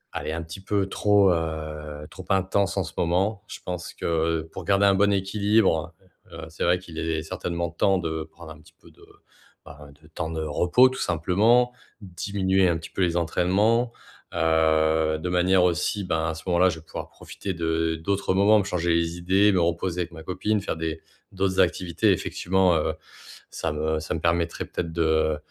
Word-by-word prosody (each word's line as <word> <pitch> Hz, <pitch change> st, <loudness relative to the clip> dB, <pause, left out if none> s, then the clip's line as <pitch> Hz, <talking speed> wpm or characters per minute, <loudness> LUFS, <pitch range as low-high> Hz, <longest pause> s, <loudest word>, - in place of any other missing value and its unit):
elle -, -, -4 dB
est -, -, -2 dB
un 85 Hz, -, -3 dB
petit 80 Hz, +4 st, -9 dB
peu 100 Hz, -1 st, 0 dB
trop 100 Hz, -1 st, +3 dB
heu, 80 Hz, -2 st, -4 dB
trop 95 Hz, -, -11 dB
intense 95 Hz, +1 st, +1 dB
en 95 Hz, -, +1 dB
ce 85 Hz, -1 st, -9 dB
moment. 95 Hz, +5 st, 0 dB
Je -, -, -8 dB
pense 90 Hz, -1 st, -5 dB
que 80 Hz, 0 st, 0 dB
pour -, -, -8 dB
garder 100 Hz, 0 st, +3 dB
un 100 Hz, -, +4 dB
bon 100 Hz, +1 st, +3 dB
équilibre, 100 Hz, -4 st, +1 dB, 0.4 s
heu, 80 Hz, -1 st, -8 dB
c'est 80 Hz, -, -5 dB
vrai 90 Hz, +1 st, +3 dB
qu'il 85 Hz, -3 st, -12 dB
est 80 Hz, -1 st, -1 dB
certainement 85 Hz, +1 st, -4 dB
temps 95 Hz, +3 st, +1 dB
de 80 Hz, -1 st, -3 dB
prendre 80 Hz, 0 st, -13 dB
un 75 Hz, -, -12 dB
petit 80 Hz, +2 st, -20 dB
peu -, -, -17 dB
de, -, -, -19 dB, 0.6 s
bah, 75 Hz, 0 st, -12 dB
de 75 Hz, -, -18 dB
temps 80 Hz, 0 st, -5 dB
de 80 Hz, -1 st, -3 dB
repos 90 Hz, -, +4 dB
tout 130 Hz, -, -7 dB
simplement, 105 Hz, +9 st, +2 dB, 0.3 s
diminuer 95 Hz, 0 st, 0 dB
un 85 Hz, -, +1 dB
petit 80 Hz, -, -9 dB
peu -, -, -3 dB
les 85 Hz, -1 st, +1 dB
entraînements. 100 Hz, +8 st, +1 dB, 0.4 s
Heu, 80 Hz, -1 st, +2 dB
de 85 Hz, +3 st, -4 dB
manière 90 Hz, +1 st, +3 dB
aussi 90 Hz, +4 st, 0 dB
ben, 80 Hz, -3 st, -1 dB
à -, -, -2 dB
ce 80 Hz, -, -10 dB
moment-là, 90 Hz, +1 st, +4 dB
je 80 Hz, -2 st, -5 dB
vais 80 Hz, -, -19 dB
pouvoir -, -, -7 dB
profiter 95 Hz, -, -7 dB
de 80 Hz, -1 st, -1 dB
d'autres 95 Hz, +4 st, -1 dB
moments, 105 Hz, +3 st, +5 dB
me -, -, 0 dB
changer 90 Hz, -3 st, -2 dB
les 85 Hz, 0 st, 0 dB
idées, 95 Hz, +4 st, +3 dB
me 95 Hz, -, +2 dB
reposer 85 Hz, +1 st, -1 dB
avec 85 Hz, 0 st, -4 dB
ma 80 Hz, -, -10 dB
copine, 105 Hz, +3 st, -1 dB
faire -, -, -3 dB
des 80 Hz, 0 st, -4 dB, 0.3 s
d'autres 95 Hz, -1 st, -1 dB
activités, 85 Hz, -1 st, +2 dB
effectivement. 95 Hz, -1 st, +1 dB
Heu, 80 Hz, 0 st, 0 dB, 0.6 s
ça -, -, -3 dB
me 80 Hz, +1 st, -1 dB
ça 80 Hz, -, -4 dB
me 80 Hz, -, -2 dB
permettrait 85 Hz, 0 st, 0 dB
peut-être 85 Hz, -2 st, -5 dB
de 80 Hz, -2 st, +1 dB
85 Hz, 195 wpm, -25 LUFS, 80-95 Hz, 0.6 s, moments